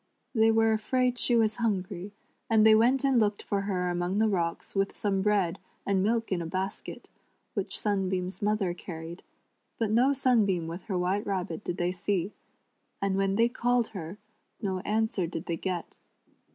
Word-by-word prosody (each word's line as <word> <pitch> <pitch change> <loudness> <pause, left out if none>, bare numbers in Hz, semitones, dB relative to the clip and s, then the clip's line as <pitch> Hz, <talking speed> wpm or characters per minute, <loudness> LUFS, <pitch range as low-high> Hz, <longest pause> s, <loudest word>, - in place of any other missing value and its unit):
They 225 -2 +4
were 225 0 +4
afraid 250 +3 +1
she 240 - +3
was 220 -1 +2
hungry, 195 -4 -2 0.4
and 220 -1 +5
they 220 - +8
went 245 +5 +4
and 270 -3 +4
looked 205 -2 +1
for 200 -1 -1
her 180 -3 -1
among 175 +2 -1
tlie 220 -1 +3
rocks 170 -2 -2
with 195 0 -1
some 195 -2 0
bread 195 -4 +1 0.3
and 195 -1 +2
milk 225 +2 0
in 180 -2 0
a 165 - -4
basket, 190 +3 -4 0.5
which - - -3
Sun 200 -3 0
beam's 185 0 -3
mother 205 -3 +1
carried, 170 -1 -8 0.6
but 225 -3 0
no 245 +5 +4
Sunbeam 220 -10 +2
wiih 165 +3 -6
her 190 -4 -2
White 185 +3 0
Rabbit 195 +1 -3
did 175 - -3
they 175 +1 0
see, 185 +1 -2 0.7
and 195 -1 0
when 195 0 +1
they 230 +2 +4
called 245 -1 +1
her 185 -2 -7 0.4
no 190 -2 -2
answer 210 -2 0
did 165 +1 -5
they 170 - -1
get. 180 -1 -4
200 Hz, 180 wpm, -28 LUFS, 180-220 Hz, 0.7 s, they